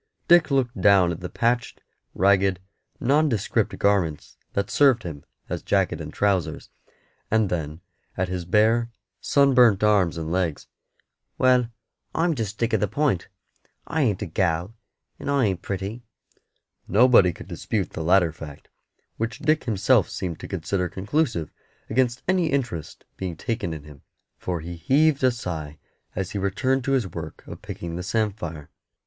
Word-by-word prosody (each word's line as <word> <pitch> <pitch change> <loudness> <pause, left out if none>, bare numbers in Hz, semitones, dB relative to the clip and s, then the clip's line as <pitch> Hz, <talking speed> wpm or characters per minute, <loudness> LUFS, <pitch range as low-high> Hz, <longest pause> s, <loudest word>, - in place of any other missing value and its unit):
Dick 175 -2 +6
looked 125 -7 0
down 95 -3 +5
at 85 - -5
the 90 - -6
patched, 120 0 -1 0.4
ragged, 95 -1 +3 0.4
nondescript 135 -4 +1
garments 95 -7 0 0.2
that 100 0 -1
served 135 -6 +4
him 75 -5 -7 0.2
as - - -4
jacket - - 0
and - - -7
trousers, 95 -6 -1 0.6
and 110 -2 +2
then 80 -1 -3 0.4
at 90 - 0
his 90 -1 -3
bare, 110 +6 +3 0.3
sunburnt 125 -8 +4
arms 100 -6 +3
and 80 0 -4
legs. 85 -4 -1 0.7
"Well, 125 -2 +3 0.5
I'm 165 +1 +2
just 110 -5 -4
Dick 115 0 -1
of 110 - +3
the 105 - +1
Point. 130 - 0 0.6
I 160 - -1
ain't 105 -7 +1
a - - -3
gal, 85 +2 -1 0.5
and - - -5
I 140 -3 +3
ain't 95 -4 -1
pretty." 100 +4 -4 0.9
Nobody 110 -3 +5
could - - -11
dispute - - -3
the - - -5
latter 85 0 +4
fact, 75 -2 -11 0.5
which 115 -1 -3
Dick 155 +2 +1
himself 110 -2 +3
seemed 90 -4 -4
to - - -7
consider 90 0 -2
conclusive 110 - -1 0.4
against 125 +1 +1
any 185 -2 +2
interest 125 - -3
being 90 -4 -4
taken 110 -6 -3
in 80 -2 -6
him, 75 -2 -14 0.4
for 90 -3 -3
he 85 +1 -7
heaved 140 - +2
a 130 - +6
sigh 80 -11 -5 0.4
as 95 -1 -3
he 100 - -3
returned 130 +7 0
to 135 - +1
his 130 -5 +2
work 95 - -8
of - - -10
picking 85 -1 -6
the - - -3
samphire. 90 -6 -3
100 Hz, 155 wpm, -24 LUFS, 85-125 Hz, 0.9 s, Dick